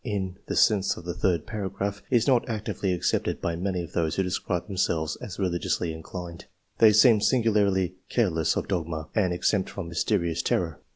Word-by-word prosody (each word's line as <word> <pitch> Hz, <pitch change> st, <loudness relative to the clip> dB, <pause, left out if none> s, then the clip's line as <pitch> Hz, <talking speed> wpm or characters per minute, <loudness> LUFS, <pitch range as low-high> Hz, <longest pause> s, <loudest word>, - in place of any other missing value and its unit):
129 100 Hz, -4 st, -4 dB
the -, -, -2 dB
sense 100 Hz, -4 st, +3 dB
of 85 Hz, -, -10 dB
the 85 Hz, -, -3 dB
third 90 Hz, -2 st, 0 dB
paragraph, 100 Hz, -2 st, -4 dB
is 120 Hz, -3 st, +3 dB
not 125 Hz, -3 st, +2 dB
actively 105 Hz, -3 st, -2 dB
accepted 90 Hz, -, 0 dB
by 85 Hz, -, -2 dB
many 90 Hz, 0 st, -2 dB
of 85 Hz, -, -10 dB
those 80 Hz, -2 st, 0 dB
who 95 Hz, -, +1 dB
describe 90 Hz, -1 st, -2 dB
them 100 Hz, -, -7 dB
selves 80 Hz, -4 st, 0 dB
as 95 Hz, -, -8 dB
religiously 85 Hz, -2 st, -1 dB
inclined: 85 Hz, +1 st, -8 dB, 0.3 s
they 110 Hz, -1 st, +8 dB
seem 105 Hz, +1 st, +6 dB
singularly 100 Hz, -7 st, +2 dB, 0.2 s
careless 85 Hz, -10 st, +1 dB
of -, -, -2 dB
dogma, 80 Hz, -4 st, -3 dB
and 95 Hz, -5 st, +2 dB
exempt 95 Hz, +2 st, 0 dB
from 100 Hz, -4 st, -6 dB
mysterious 85 Hz, -1 st, 0 dB
terror. 80 Hz, -4 st, -1 dB
95 Hz, 180 wpm, -26 LUFS, 85-105 Hz, 0.3 s, they